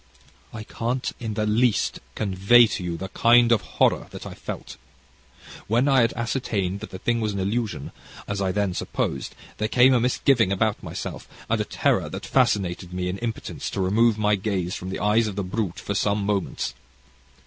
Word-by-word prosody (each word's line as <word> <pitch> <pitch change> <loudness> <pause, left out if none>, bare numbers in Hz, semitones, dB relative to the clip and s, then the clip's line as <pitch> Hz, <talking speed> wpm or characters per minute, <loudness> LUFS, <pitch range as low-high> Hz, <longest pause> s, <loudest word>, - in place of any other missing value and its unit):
"I 110 - -7
can't, 120 +3 -2
in 110 -3 -4
the 105 - 0
least, 115 +2 +1 0.2
convey 100 +4 +5
to 105 -3 -3
you 85 -1 -3
the 95 +2 -6
kind 120 +2 +5
of 115 - +4 0.2
horror - - +3
that - - -9
I - - -7
felt. 65 - -7 0.9
When 120 +6 +2
I 135 -2 +5
had 115 - +3
ascertained 105 -6 -2
that - - -8
the 95 - -7
thing 115 +4 0
was 105 -2 -1
an 100 - -3
illusion, 105 +3 -2 0.4
as 100 -1 -2
I 95 -1 +1
then 100 -2 0
supposed, 70 - -3 0.2
there 110 - 0
came 125 +3 +5
a 125 - +4
misgiving 120 -3 +2
about 105 +2 0
myself - - -6 0.2
and - - +1
a - - -2
terror - - 0
that - - -6
fascinated 90 -2 +1
me 90 0 -2
in 95 +2 -4
impotence 115 -1 -4
to - - -5
remove 110 +4 +3
my 105 -1 +2
gaze 95 -3 -1
from 90 - -5
the - - -3
eyes 110 +2 +3
of 105 - -5
the 100 - -2
brute 95 -1 -3
for 100 - -3
some 100 0 0
moments. 100 -2 -1
105 Hz, 190 wpm, -24 LUFS, 95-115 Hz, 0.9 s, convey